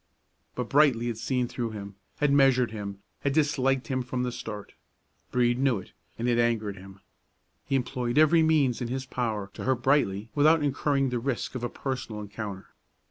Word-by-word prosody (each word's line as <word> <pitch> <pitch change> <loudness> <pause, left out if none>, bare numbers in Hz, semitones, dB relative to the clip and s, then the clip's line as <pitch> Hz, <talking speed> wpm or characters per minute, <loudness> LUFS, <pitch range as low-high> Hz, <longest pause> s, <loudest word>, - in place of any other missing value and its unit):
But 125 -2 -3
Brightly 135 -5 +4
had 120 -2 -3
seen 125 -2 0
through 120 -1 -3
him, 100 -1 -7 0.2
had 145 -1 +2
measured 130 -4 +4
him, 100 -2 -6 0.2
had 140 - 0
disliked 135 -3 +2
him 130 -1 -1
from 125 0 -3
the 125 - -1
start. 105 -4 -7 0.6
Brede 120 0 +2
knew 135 -4 +3
it, 95 - -10 0.3
and 120 - -2
it 120 -1 +2
angered 110 -4 +1
him. 95 0 -13 0.7
He 135 - +1
employed 125 -1 -1
every 155 +2 +6
means 150 -6 +3
in 120 - -1
his 130 +2 -3
power 110 -6 -3
to - - -7
hurt 130 -2 0
Brightly 110 -6 +2
without 155 +1 +4
incurring 140 -1 +1
the 125 -1 -1
risk 130 0 -2
of 125 -2 -5
a 120 - -1
personal 125 -5 -4
encounter. 105 -2 -7
125 Hz, 185 wpm, -27 LUFS, 110-135 Hz, 0.7 s, every